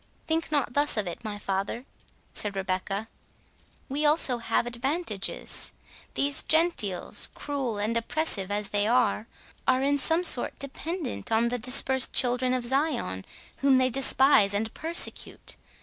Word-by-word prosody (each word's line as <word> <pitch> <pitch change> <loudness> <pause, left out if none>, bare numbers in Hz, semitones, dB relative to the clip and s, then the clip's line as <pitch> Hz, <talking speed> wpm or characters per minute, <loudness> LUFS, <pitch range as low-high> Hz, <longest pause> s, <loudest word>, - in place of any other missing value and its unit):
"Think 325 0 -2
not 285 -5 -1
thus 290 -2 +2
of 210 - 0
it, 175 +5 -7
my 210 -2 -5
father," 200 +5 -4 0.5
said 205 -1 -3
Rebecca; 195 +2 -3 0.8
"we 285 +3 -3
also 295 -5 +3
have 230 0 -1
advantages. 240 - -2 0.4
These 280 0 +1
Gentiles, 315 - 0
cruel 270 -7 -4
and 210 +3 -2
oppressive 230 -5 -1
as 205 0 -3
they 205 0 0
are, 225 -2 +1 0.4
are 260 0 +2
in 285 +1 +1
some 325 +5 +2
sort 265 -8 +2
dependent 285 0 -5
on 225 +1 +2
the 245 0 -3
dispersed 255 +2 +4
children 250 0 +2
of 250 -1 -2
Zion, 255 - -1 0.3
whom 275 -1 +3
they 255 0 +1
despise 265 -5 +4
and 220 +2 -2
persecute. 330 +2 +1
250 Hz, 140 wpm, -26 LUFS, 210-285 Hz, 0.8 s, dispersed